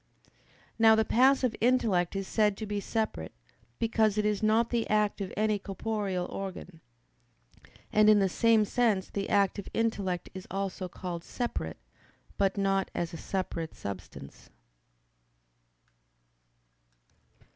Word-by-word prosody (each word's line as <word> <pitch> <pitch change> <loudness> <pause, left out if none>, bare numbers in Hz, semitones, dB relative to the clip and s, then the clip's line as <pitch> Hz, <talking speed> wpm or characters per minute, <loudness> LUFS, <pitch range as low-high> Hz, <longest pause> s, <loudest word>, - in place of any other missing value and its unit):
Now 225 0 +7
the 220 0 +2
passive 255 0 +3
intellect 215 -8 +2
is 195 -1 -3
said 210 -2 +2
to 220 - -4
be 205 0 -2
separate, 215 - -3 0.4
because 220 -2 +1
it 210 - +1
is 210 -1 0
not 220 +2 +2
the 235 -2 0
act 210 -1 +1
of 190 - -4
any 215 -1 +1
corporeal 195 -2 -3
organ. 185 -3 -7 1.1
And 215 0 +6
in 215 - +7
the 195 -1 +3
same 220 +3 +3
sense 215 -4 +1
the 200 -1 -3
active 200 0 +1
intellect 200 -6 -1
is 185 0 -8
also 195 -1 -3
called 175 -1 -6
"separate"; 235 - -4 0.6
but 195 0 +2
not 195 -1 +1
as 170 -1 -2
a - - -5
separate 165 -3 -4
substance. 100 -2 -9
205 Hz, 125 wpm, -29 LUFS, 190-220 Hz, 1.1 s, Now